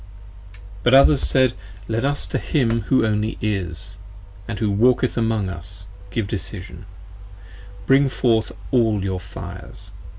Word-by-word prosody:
But 120 Hz, +6 st, +5 dB
others 140 Hz, +1 st, +6 dB
said: 130 Hz, -2 st, +3 dB, 0.3 s
Let 115 Hz, +3 st, -1 dB
us 145 Hz, +1 st, 0 dB
to -, -, -2 dB
him 115 Hz, -6 st, +1 dB
who 130 Hz, -4 st, +4 dB
only 105 Hz, 0 st, 0 dB
Is, 95 Hz, -3 st, -3 dB, 0.3 s
& 100 Hz, +3 st, -9 dB
who 105 Hz, 0 st, 0 dB
Walketh 125 Hz, +4 st, +3 dB
among 110 Hz, -4 st, 0 dB
us, 95 Hz, +1 st, -7 dB, 0.2 s
give 100 Hz, +2 st, -2 dB
decision: 100 Hz, -3 st, -6 dB, 1.0 s
bring 135 Hz, +3 st, +4 dB
forth 115 Hz, -4 st, +1 dB, 0.2 s
all 110 Hz, -6 st, +2 dB
your 95 Hz, -1 st, -2 dB
fires! 90 Hz, -1 st, -9 dB
110 Hz, 130 wpm, -22 LUFS, 95-120 Hz, 1.0 s, others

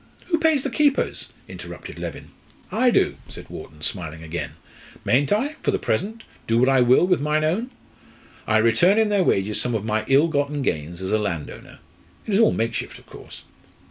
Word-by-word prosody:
"Who 330 Hz, -2 st, +2 dB
pays 315 Hz, -4 st, +3 dB
the -, -, -2 dB
keepers?" 290 Hz, -2 st, +1 dB, 0.2 s
interrupted -, -, -9 dB
Leven. -, -, -7 dB, 0.4 s
"I 255 Hz, -, +3 dB
do," -, -, +2 dB
said -, -, -9 dB
Wharton, 75 Hz, 0 st, -10 dB
smiling 80 Hz, -3 st, -4 dB
again. 80 Hz, +2 st, -5 dB, 0.5 s
"Mayn't 140 Hz, +6 st, +2 dB
I 275 Hz, +9 st, 0 dB
for -, -, -1 dB
the -, -, +2 dB
present 225 Hz, +3 st, -2 dB, 0.2 s
do 115 Hz, -, +2 dB
what 125 Hz, +2 st, +4 dB
I 135 Hz, -1 st, +4 dB
will 125 Hz, +7 st, +5 dB
with 180 Hz, -4 st, +2 dB
mine 150 Hz, +1 st, +1 dB
own? 190 Hz, +11 st, 0 dB, 0.8 s
I 110 Hz, -, +3 dB
return 145 Hz, -, +4 dB
in 220 Hz, -1 st, +3 dB
their 200 Hz, -2 st, +3 dB
wages 105 Hz, -, +1 dB
some 125 Hz, -2 st, -1 dB
of 110 Hz, -1 st, -2 dB
my 110 Hz, 0 st, 0 dB
ill 140 Hz, +4 st, +5 dB
gotten 145 Hz, -2 st, -1 dB
gains 85 Hz, -, -3 dB
as 95 Hz, -, -3 dB
a 110 Hz, -, +2 dB
landowner. 85 Hz, -8 st, -5 dB, 0.5 s
It 215 Hz, -, -3 dB
is 195 Hz, -, +4 dB
all 225 Hz, -, +5 dB
makeshift, 115 Hz, +1 st, -3 dB
of -, -, -18 dB
course." -, -, -12 dB
140 Hz, 190 wpm, -23 LUFS, -, 0.8 s, will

